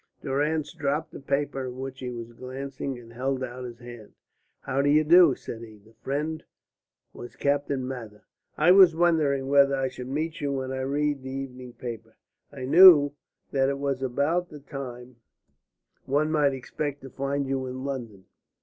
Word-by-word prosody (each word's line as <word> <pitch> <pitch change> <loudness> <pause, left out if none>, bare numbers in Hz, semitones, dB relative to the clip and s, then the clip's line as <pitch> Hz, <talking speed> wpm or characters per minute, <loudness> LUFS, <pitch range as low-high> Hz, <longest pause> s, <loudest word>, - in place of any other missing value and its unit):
Durrance 150 +3 -1
dropped 155 0 -2
the - - -9
paper 140 -1 -2
at 125 - -6
which 130 +1 -7
he 125 - -5
was 120 -1 -7
glancing 135 +1 -6
and 115 -1 -13
held 130 +2 -2
out 125 0 -6
his 120 -1 -8
hand. 120 -3 -12 0.5
"How 135 +1 -1
do 140 - +2
you 155 +2 +5
do?" 165 -3 +6
said 115 - -8
he. 110 -2 -11
This 110 +2 -22
friend 155 +3 -3 0.7
was 120 - -10
Captain 140 -2 -1
Mather. 115 -5 -8 0.3
"I 160 +4 +5
was 185 -3 +7
wondering 155 -5 +2
whether 140 0 +5
I 135 -1 -1
should 125 -1 -8
meet 155 +4 -3
you 140 -1 -1
when 130 -1 -3
I 130 - -3
read 145 +1 -1
the 130 - -7
evening 130 -2 -7
paper. 120 -2 -8 0.3
I 135 -3 -6
knew 150 -1 +8 0.4
that 135 -1 +2
it 140 - -2
was 140 -1 -2
about 145 +7 0
the 150 - -10
time 125 -3 -8 0.9
one 150 +3 +1
might 145 -3 +3
expect 145 +2 -5
to 135 - -10
find 140 +2 -2
you 135 -1 -2
in 130 +1 -6
London. 115 -9 -6
135 Hz, 175 wpm, -26 LUFS, 125-145 Hz, 0.9 s, knew